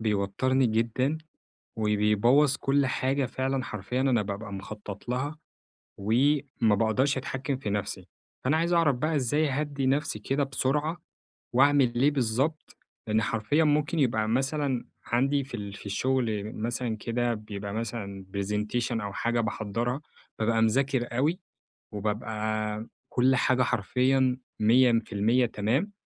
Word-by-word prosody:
بيوترني 110 +5 +1
جدًا، 120 +7 0 0.6
وبيبوظ 110 +7 +3
كل 140 0 +2
حاجة 130 +2 0
فعلًا 130 +1 -2
حرفيًا 105 +5 -3
أنا 130 -5 +3
بابقى 100 +1 -5
مخطط 100 +2 -8
لها، 135 +5 -2 0.6
وما 125 +1 +2
باقدرش 115 +7 +2
أتحكم 135 +1 -3
في 120 -5 -4
نفسي. 100 -1 -3 0.4
فأنا 140 +5 +3
عايز 170 +2 +1
أعرف 165 -6 +4
بقى 155 +5 0
إزاي 145 +3 +1
أهدِّي 140 -1 -1
نفسي 135 -5 0
كده 135 +6 0
بسرعة؟ 145 +5 -1 0.6
وأعمل 135 -2 +4
ليه 145 +3 +4
بالضبط؟ 135 +4 -1 0.3
لأن 110 0 +2
حرفيًا 115 +9 +1
ممكن 150 +2 +1
يبقى 110 -6 +2
مثلًا 135 +1 0 0.2
عندي 135 +3 +1
في 130 - -7
ال 100 -2 -6
في 105 - -11
الشغل 110 -1 -1
مثلًا 115 0 -2
كده 120 +2 -1
بيبقى 105 -2 -6
مثلًا 105 -4 -5
Presentation 105 +5 -1
أو 100 -1 -5
حاجة 120 +2 0
باحضرها، 115 +4 -2 0.4
بابقى 115 0 +2
مذاكر 120 +1 +1
أوي، 155 +8 +1 0.5
وبابقى 105 +1 -2 0.2
كل 130 +1 +3
حاجة 130 0 +3
حرفيًا 130 +3 +2 0.2
100% 115 0 +3
تمام؟ 120 - -1
120 Hz, 125 wpm, -28 LUFS, 110-135 Hz, 0.6 s, أعرف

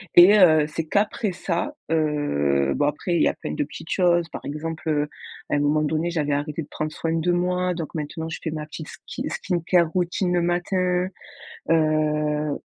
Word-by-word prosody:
Et 190 +5 +9
heu, 155 -5 +6
c'est 160 +1 -4
qu'après 210 0 +1
ça, 175 -1 -2 0.2
heu, 70 - +1
bon, - - +1
après, 170 +4 -1
il - - +2
y - - +5
a - - -2
plein 75 - -6
de - - 0
petites 150 +3 -10
choses. 175 -2 +3
Par - - -8
exemple, 160 +2 -4
heu, 150 -1 +1 0.4
à - - +1
un - - +2
moment 150 +1 +2
donné, 160 +3 0
j'avais 150 -4 0
arrêté 150 +2 -2
de - - -14
prendre 155 0 -3
soin 165 +1 -2
de 165 +2 +1
moi, 180 +1 +1
donc 165 -3 -6
maintenant, 160 +1 -4
je 160 - -5
fais 160 - -2
ma 150 -1 -4
petite 155 0 -8 0.2
ski - - -5
skincare 175 -2 +1
routine 180 +1 0
le 175 - +2
matin, 180 +1 0 0.6
heu 150 -2 +1
160 Hz, 195 wpm, -24 LUFS, 150-175 Hz, 0.6 s, Et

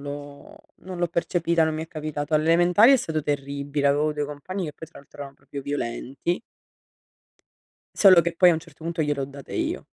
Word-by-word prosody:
l'ho 145 0 -9 0.3
non 185 -1 -7
l'ho 175 0 0
percepita, 170 -1 +1
non 160 0 -1
mi 155 - -3
è - - -17
capitato. 155 -1 -5
Alle 155 0 +3
elementari 175 +9 +5
è - - +7
stato 160 -10 -3
terribile, 140 0 -2
avevo 145 +2 +2
2 150 0 -2
compagni 150 +7 -5
che 150 - -5
poi 160 +2 -11
tra 165 - -15
l'altro 140 - -18
erano 140 -1 -8
proprio 140 - -9
violenti 140 +4 -3 1.6
solo 185 -4 +7
che 170 0 -3
poi 180 +1 +6
a - - +4
un - - -1
certo 160 -1 -15
punto 165 -1 -1
gliele 145 -2 -1
ho - - 0
date 140 0 -12
io. - - -3
155 Hz, 205 wpm, -24 LUFS, 145-170 Hz, 1.6 s, è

